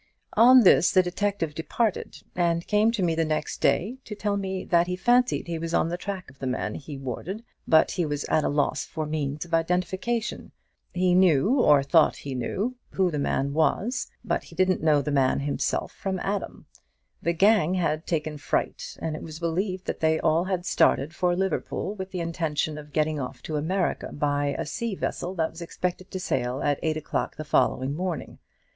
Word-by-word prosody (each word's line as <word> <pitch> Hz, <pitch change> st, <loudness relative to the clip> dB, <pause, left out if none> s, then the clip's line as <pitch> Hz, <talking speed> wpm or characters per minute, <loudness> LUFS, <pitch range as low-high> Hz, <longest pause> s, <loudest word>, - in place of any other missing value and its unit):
On 250 Hz, +3 st, +8 dB
this 180 Hz, -, +6 dB
the 185 Hz, -, +5 dB
detective 180 Hz, -3 st, -1 dB
departed, 195 Hz, +7 st, -2 dB
and 170 Hz, -1 st, +1 dB
came 210 Hz, +1 st, +3 dB
to 230 Hz, -5 st, -1 dB
me 170 Hz, -2 st, +2 dB
the 165 Hz, 0 st, +1 dB
next 155 Hz, -1 st, -2 dB
day, 190 Hz, -, +1 dB
to 210 Hz, -, -6 dB
tell 205 Hz, 0 st, -1 dB
me 190 Hz, -1 st, -3 dB
that 170 Hz, 0 st, +3 dB
he 180 Hz, -, -1 dB
fancied 245 Hz, +5 st, +2 dB
he 170 Hz, -2 st, -4 dB
was 165 Hz, +1 st, -2 dB
on 165 Hz, -, +2 dB
the 175 Hz, -, -2 dB
track 190 Hz, 0 st, -5 dB
of 135 Hz, -, -24 dB
the 130 Hz, -, -3 dB
man 125 Hz, -4 st, -2 dB
he 145 Hz, +2 st, -7 dB
wanted, 145 Hz, -, -5 dB, 0.2 s
but 160 Hz, -1 st, +5 dB
he 175 Hz, -, -1 dB
was 145 Hz, -1 st, -2 dB
at 155 Hz, -, +1 dB
a -, -, +1 dB
loss 145 Hz, 0 st, 0 dB
for 155 Hz, -, -4 dB
means 150 Hz, 0 st, -3 dB
of 170 Hz, -, -13 dB
identification. 185 Hz, +7 st, -1 dB, 0.4 s
He 180 Hz, 0 st, +2 dB
knew, 185 Hz, -, +4 dB
or 145 Hz, -, +5 dB
thought 155 Hz, +3 st, +4 dB
that -, -, -13 dB
he 140 Hz, -, -5 dB
knew, 200 Hz, -, -2 dB
who 185 Hz, -2 st, +1 dB
the 150 Hz, -, -2 dB
man 140 Hz, 0 st, 0 dB
was; 210 Hz, -, +1 dB, 0.2 s
but -, -, -1 dB
he 165 Hz, -, -14 dB
didn't 185 Hz, +1 st, +2 dB
know 150 Hz, -3 st, +3 dB
the 150 Hz, -, -2 dB
man 135 Hz, -1 st, +2 dB
himself 140 Hz, 0 st, -1 dB
from 190 Hz, -1 st, -3 dB
Adam. 200 Hz, 0 st, -3 dB, 0.6 s
The 170 Hz, -, +1 dB
gang 190 Hz, -1 st, +4 dB
had 165 Hz, -3 st, -1 dB
taken 155 Hz, -2 st, -2 dB
fright, -, -, -2 dB
and 160 Hz, -1 st, -3 dB
it -, -, -7 dB
was 160 Hz, -1 st, -8 dB
believed 185 Hz, +3 st, -2 dB
that -, -, -3 dB
they 160 Hz, 0 st, +3 dB
had 160 Hz, -, -1 dB
all 175 Hz, +3 st, +1 dB
started 155 Hz, -3 st, +2 dB
for 175 Hz, -1 st, +1 dB
Liverpool, 190 Hz, +1 st, -2 dB
with 190 Hz, -2 st, -6 dB
the 185 Hz, -2 st, -4 dB
intention 160 Hz, -2 st, -2 dB
of 150 Hz, 0 st, -12 dB
getting 155 Hz, 0 st, 0 dB
off 125 Hz, -1 st, -6 dB
to 155 Hz, -, -4 dB
America 175 Hz, +5 st, -1 dB
by 145 Hz, -1 st, 0 dB
a 205 Hz, +9 st, -3 dB
vessel 180 Hz, 0 st, -3 dB
that 160 Hz, -2 st, 0 dB
was 165 Hz, -, -11 dB
expected 180 Hz, +2 st, -4 dB
to 185 Hz, -, -5 dB
sail 130 Hz, -7 st, -1 dB
at 145 Hz, -1 st, +1 dB
eight 155 Hz, -1 st, 0 dB
o'clock 155 Hz, -, -3 dB
the 155 Hz, -, -6 dB
following 135 Hz, -2 st, +1 dB
morning. 175 Hz, -3 st, -4 dB
170 Hz, 200 wpm, -26 LUFS, 150-190 Hz, 0.6 s, On